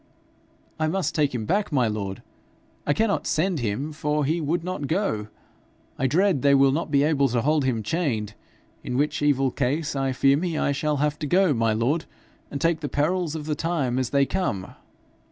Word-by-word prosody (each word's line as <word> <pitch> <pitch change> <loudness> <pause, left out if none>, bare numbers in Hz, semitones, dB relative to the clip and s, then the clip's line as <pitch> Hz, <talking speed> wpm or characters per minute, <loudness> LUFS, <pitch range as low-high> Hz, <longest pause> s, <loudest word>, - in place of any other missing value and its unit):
'I 155 - +1
must 160 -2 -1
take 145 -4 +1
him 110 -3 -3
back, 200 - 0
my 130 -5 +2
lord! 100 -3 -4 0.6
I 145 - +4
cannot 220 +4 0
send 170 +1 +1
him, 125 +6 -2
for 150 -1 -1
he 165 +4 0
would 165 +3 -1
not 180 -6 -3
go. 155 - -1 0.7
I 130 - +2
dread 175 +1 +2
they 140 +1 +5
will 135 0 +5
not 155 +3 -2
be 140 -1 +3
able 145 -2 +3
to 120 0 0
hold 150 -1 +2
him 115 -4 0
chained; 110 - -1 0.5
in 125 - -3
which 145 +2 0
evil 135 -3 +2
case 145 +4 -1
I 135 -1 0
fear 135 +2 +3
me 165 0 -2
I - - +1
shall 150 +1 0
have 150 +1 0
to 150 - -3
go, 180 +1 +3
my 115 -2 +1
lord, 130 +9 0 0.4
and 140 - -4
take 165 0 +1
the 145 -2 -4
perils 165 +2 0
of 155 -2 -5
the 155 - -1
time 145 -6 -1
as 130 -3 -1
they 140 -1 +3
come.' 135 - -2
145 Hz, 200 wpm, -24 LUFS, 130-160 Hz, 0.7 s, they